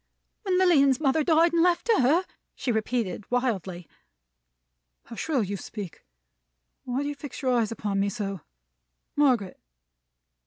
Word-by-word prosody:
"When 375 -4 0
Lilian's 280 -8 +4
mother 300 +1 +2
died 330 +2 +4
and 335 - +3
left 350 +2 +2
her!" 325 +5 +3 0.3
she 250 - -2
repeated, 220 -2 -2
wildly. 195 - -2 1.2
"How 230 - -11
shrill 275 -2 0
you 200 0 -3
speak! 195 -1 -8 0.8
Why 255 +3 -2
do - - -3
you 290 - -2
fix 285 -1 -9
your 260 - +2
eyes 230 -3 +1
upon 205 -3 -2
me 200 +1 +1
so? 200 -5 -4 0.7
Margaret!" 250 -10 +2
250 Hz, 140 wpm, -26 LUFS, 205-305 Hz, 1.2 s, Lilian's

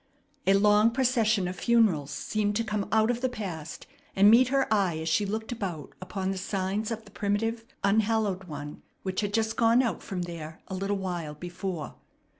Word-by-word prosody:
A 195 - +6
long 210 +2 +5
procession 230 -6 +2
of 180 +1 -5
funerals 215 - +3
seemed 205 +8 -1
to 230 - +1
come 210 -2 -2
out 220 +1 +4
of 245 0 -3
the 255 - +1
past 180 -10 -6 0.3
and 200 +2 +7
meet 245 +2 +6
her 270 +1 +2
eye 190 -6 +2
as 160 0 -4
she 200 +6 +2
looked 220 +3 -3
about 185 - -5
upon 190 +1 -3
the 190 - -3
signs 195 +3 -2
of 225 -1 -5
the 205 - -15
primitive, 225 +3 -1 0.2
unhallowed 205 -2 +1
one 150 -3 -7 0.2
which 190 +1 -1
had 205 -1 -2
just 220 +1 0
gone 235 +2 +5
out 235 - -2
from 180 -2 -4
there 160 -2 -7
a - - -5
little 195 +2 -1
while 175 -5 -4
before. 175 0 -5
205 Hz, 190 wpm, -28 LUFS, 180-220 Hz, 0.3 s, and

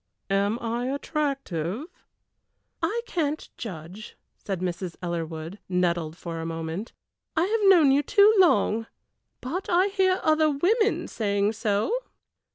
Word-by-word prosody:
"Am 200 +3 +2
I 235 +2 -2
attractive?" 275 - -2 1.0
"I 470 +3 0
can't 310 -8 -2
judge," 185 0 -8 0.2
said 195 -3 -4
Mrs. 180 -1 -3
Ellerwood, 165 +1 -4
nettled 170 -3 0
for 165 -2 -6
a - - -4
moment. 165 +6 -4 0.5
"I 325 - +4
have 420 0 +3
known 325 -8 +7
you 280 +2 +4
too 405 +8 +5
long, 225 - +3 0.5
but 340 +10 -4
I 370 +3 +3
hear 380 -1 +2
other 310 0 +4
women 420 +10 +1
saying 205 -1 0
so." 215 - 0
225 Hz, 125 wpm, -26 LUFS, -, 1.0 s, known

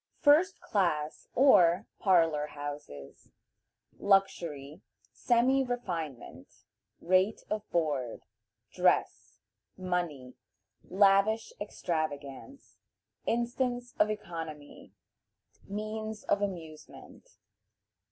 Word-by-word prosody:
First 315 +6 +4
Class, 155 -7 -1
or 185 -8 +5
"Parlor 165 -6 +3
Houses." 145 - -9 0.7
Luxury. 170 -8 0 0.3
Semi 255 +3 +2
refinement. 165 - -5 0.5
Rate 185 +4 +2
of 215 0 -3
Board. 145 -8 -1 0.5
Dress. - - +1 0.4
Money. 175 -9 -3 0.6
Lavish 200 - +3
Extravagance. 155 - -5 0.5
Instance 245 +1 -1
of 215 - +4
Economy. 165 -8 -7 0.8
Means 215 +1 -5
of 205 - +1
Amusement. 175 - -8
185 Hz, 70 wpm, -30 LUFS, 150-220 Hz, 0.8 s, or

